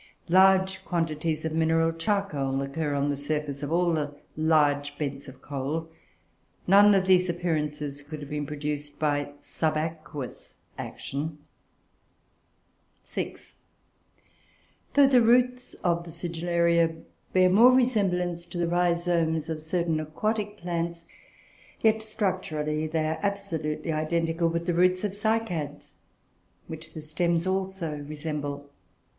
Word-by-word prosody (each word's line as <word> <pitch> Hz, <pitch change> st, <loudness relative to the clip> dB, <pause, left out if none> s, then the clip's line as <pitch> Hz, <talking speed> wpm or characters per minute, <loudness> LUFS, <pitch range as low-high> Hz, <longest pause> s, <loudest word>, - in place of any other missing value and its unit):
Large 190 Hz, +1 st, +5 dB
quantities 160 Hz, -2 st, -1 dB
of 160 Hz, -, -1 dB
mineral 165 Hz, 0 st, +3 dB
charcoal 165 Hz, -7 st, -1 dB
occur 145 Hz, +1 st, -2 dB
on 140 Hz, +1 st, +1 dB
the -, -, -1 dB
surface 145 Hz, 0 st, -3 dB
of 145 Hz, +1 st, -4 dB
all 175 Hz, 0 st, +2 dB
the 145 Hz, -2 st, -2 dB, 0.2 s
large 145 Hz, -2 st, +2 dB
beds 140 Hz, -2 st, -4 dB
of 130 Hz, 0 st, -13 dB
coal. 145 Hz, +4 st, -3 dB, 0.8 s
None 200 Hz, +2 st, +7 dB
of 190 Hz, -1 st, +2 dB
these 185 Hz, -1 st, +4 dB
appearances 150 Hz, -4 st, -2 dB
could 150 Hz, +1 st, -8 dB
have 145 Hz, -1 st, -8 dB
been 150 Hz, -1 st, -2 dB
produced 150 Hz, 0 st, -4 dB
by 145 Hz, -2 st, 0 dB
subaqueous 155 Hz, -4 st, -3 dB, 0.2 s
action. 150 Hz, +3 st, -5 dB, 1.7 s
(6) -, -, -6 dB, 1.4 s
Though 285 Hz, -1 st, +8 dB
the 260 Hz, -2 st, +5 dB
roots 250 Hz, +2 st, +3 dB
of 170 Hz, -1 st, +1 dB
the 170 Hz, -, -10 dB
Sigillaria 170 Hz, 0 st, +1 dB, 0.4 s
bear 185 Hz, 0 st, +4 dB
more 230 Hz, +7 st, +8 dB
resemblance 185 Hz, -9 st, +1 dB
to 175 Hz, -, -7 dB
the 175 Hz, -, +1 dB
rhizomes 170 Hz, -2 st, +1 dB
of 155 Hz, -1 st, -3 dB
certain 165 Hz, 0 st, 0 dB
aquatic 205 Hz, +7 st, -2 dB
plants; 170 Hz, -1 st, -3 dB, 0.8 s
yet, 220 Hz, 0 st, +3 dB
structurally, 160 Hz, -8 st, -2 dB
they 155 Hz, 0 st, 0 dB
are 160 Hz, 0 st, -1 dB
absolutely 170 Hz, -6 st, -2 dB
identical 165 Hz, +2 st, 0 dB
with 170 Hz, 0 st, -1 dB
the 175 Hz, -, +1 dB
roots 180 Hz, +2 st, +3 dB
of 205 Hz, -, 0 dB
Cycads, 200 Hz, -8 st, -2 dB, 0.7 s
which 160 Hz, 0 st, -8 dB
the 155 Hz, -, -5 dB
stems 170 Hz, +2 st, 0 dB
also 190 Hz, -4 st, -2 dB
resemble. 145 Hz, -1 st, -5 dB
165 Hz, 125 wpm, -27 LUFS, 150-180 Hz, 1.7 s, Though